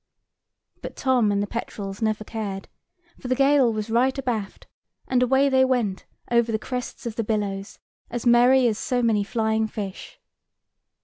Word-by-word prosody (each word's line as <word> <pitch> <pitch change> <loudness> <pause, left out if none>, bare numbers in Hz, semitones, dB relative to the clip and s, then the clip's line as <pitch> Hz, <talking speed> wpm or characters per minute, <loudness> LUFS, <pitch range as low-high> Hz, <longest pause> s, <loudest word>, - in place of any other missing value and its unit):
But - - -7
Tom 250 -6 +2
and 200 0 +1
the - - -1
petrels 200 -2 -6
never 215 -1 0
cared, 205 -3 -5 0.5
for 255 - -7
the 255 - +1
gale 275 -2 +4
was 215 0 -4
right 255 +4 +2
abaft, 235 -7 -3 0.4
and 255 -1 +2
away 265 +2 +3
they 260 -1 +4
went 240 -7 0 0.3
over 235 -1 +3
the 220 - +1
crests 250 +3 -6
of 230 -2 -5
the 230 - 0
billows, 205 -2 -3 0.3
as 240 0 -5
merry 245 +2 +5
as 220 -2 -1
so 245 -1 -1
many 215 -3 +2
flying 220 +1 0
fish. 200 -3 -7
230 Hz, 165 wpm, -24 LUFS, 210-250 Hz, 0.5 s, merry